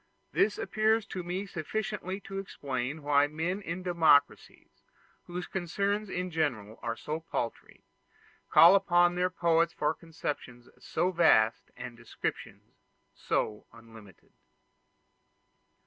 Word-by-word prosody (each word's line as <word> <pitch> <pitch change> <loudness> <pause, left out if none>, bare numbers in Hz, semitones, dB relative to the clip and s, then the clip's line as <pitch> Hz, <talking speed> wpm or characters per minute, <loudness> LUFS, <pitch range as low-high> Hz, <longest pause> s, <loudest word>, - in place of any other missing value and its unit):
This 205 0 +2
appears 215 +2 +1
to 185 - -5
me 180 +3 -4
sufficiently 195 +2 -4
to 195 0 -6
explain 140 -5 -4
why 145 0 +4
men 165 +6 -3
in 175 -1 -5
democracies, 165 -5 +2 0.5
whose 175 0 -5
concerns 200 +3 -2
are - - -6
in 180 0 -3
general 120 -10 -2 0.2
so 155 +1 -4
paltry, 120 -7 -5 0.7
call 170 +3 +8
upon 175 -2 +4
their 180 +1 +1
poets 170 -2 +2
for 150 - 0
conceptions 145 -7 -6
so 185 - -1
vast 140 -11 +3
and 125 -1 -7
descriptions 115 -1 -6 0.3
so 105 -1 -2
unlimited. 110 -5 -16
170 Hz, 115 wpm, -30 LUFS, 145-185 Hz, 0.7 s, call